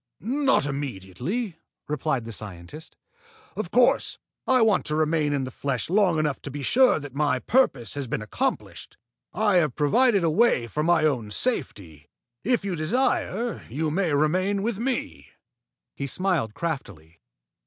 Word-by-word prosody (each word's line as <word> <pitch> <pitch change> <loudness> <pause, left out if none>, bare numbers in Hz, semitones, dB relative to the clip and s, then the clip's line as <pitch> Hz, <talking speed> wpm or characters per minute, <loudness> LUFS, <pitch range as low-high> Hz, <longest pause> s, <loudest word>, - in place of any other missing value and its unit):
"Not 270 - +1
immediately," 140 - -4 0.3
replied 145 -4 -1
the 115 - -6
scientist. 105 - -9 0.6
"Of 210 -5 -4
course, 245 +4 +3 0.3
I 255 -3 +4
want 215 -4 +3
to 150 - +1
remain 155 -1 +1
in 140 -2 0
the 130 - -5
flesh 140 +4 -3
long 190 -4 +3
enough 150 -3 -1
to - - -6
be 140 +1 -6
sure 255 - +4
that 145 -3 -9
my 145 -2 +1
purpose 135 - +1
has 140 -2 -4
been 110 - -3
accomplished. 105 - -3 0.3
I 210 -3 +2
have 155 -7 +1
provided 200 - +3
a 165 - +3
way 170 - +3
for 115 +7 -3
my 165 0 +3
own 125 -8 0
safety. 100 - -3 0.3
If 235 -2 +1
you 190 -3 -1
desire, 235 +6 0
you 150 +6 -2
may 180 0 0
remain 185 +7 +1
with 220 -2 -2
me." 255 +2 -3 0.7
He 140 - -4
smiled 165 - -1
craftily. 95 - -5
155 Hz, 155 wpm, -25 LUFS, 130-205 Hz, 0.7 s, I